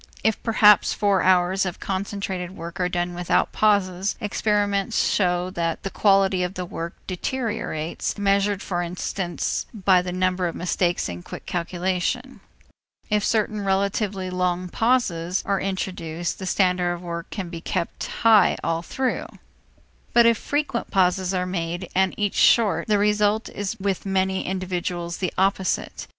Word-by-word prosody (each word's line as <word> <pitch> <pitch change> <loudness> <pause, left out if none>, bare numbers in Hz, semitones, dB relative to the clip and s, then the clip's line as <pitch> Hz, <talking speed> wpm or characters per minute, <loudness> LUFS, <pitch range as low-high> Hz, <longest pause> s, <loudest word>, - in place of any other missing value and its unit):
If 220 -1 +1
perhaps 210 -3 +5
four 200 -3 +2
hours 185 +1 +3
of 185 -3 -4
concentrated 190 -1 -4
work 170 +2 -7
are 180 -1 +1
done 175 0 -2
without 175 0 +1
pauses, 195 -2 +1
experiment 205 -2 0
shows 180 -1 +1
that 165 -2 -2
the 195 - -3
quality 195 -2 +3
of 180 +2 -2
the 180 - -3
work 170 0 -6
deteriorates, 205 -6 -3
measured 200 0 +1
for 175 -2 -2
instance 175 +1 -3
by 190 -3 +4
the 180 0 -4
number 185 0 0
of 170 - -5
mistakes 175 0 0
in 85 0 -6
quick - - -9
calculation. 185 +9 -2 0.7
If 210 -1 +2
certain 215 -2 0
relatively 195 -1 0
long 180 0 -1
pauses 185 -7 +1
are 195 -1 0
introduced, 175 -3 -3
the 190 - -5
standard 180 -2 +2
of 175 - -11
work 170 -1 -5
can 190 -4 -5
be 170 -1 -7
kept 170 - -3
high 220 -4 +4
all 165 0 0
through. 255 +9 -2 0.9
But 235 -1 +6
if 230 0 +5
frequent 290 -5 -2
pauses 185 -1 +2
are 180 -1 0
made, 175 0 -3
and 190 0 +2
each 205 -2 0
short, 225 -4 +4
the 210 -1 +3
result 210 +1 +2
is 205 +2 -4
with 195 0 -2
many 190 0 0
individuals 180 -2 -3
the 185 - -2
opposite. 190 0 0
190 Hz, 150 wpm, -24 LUFS, 180-205 Hz, 0.9 s, But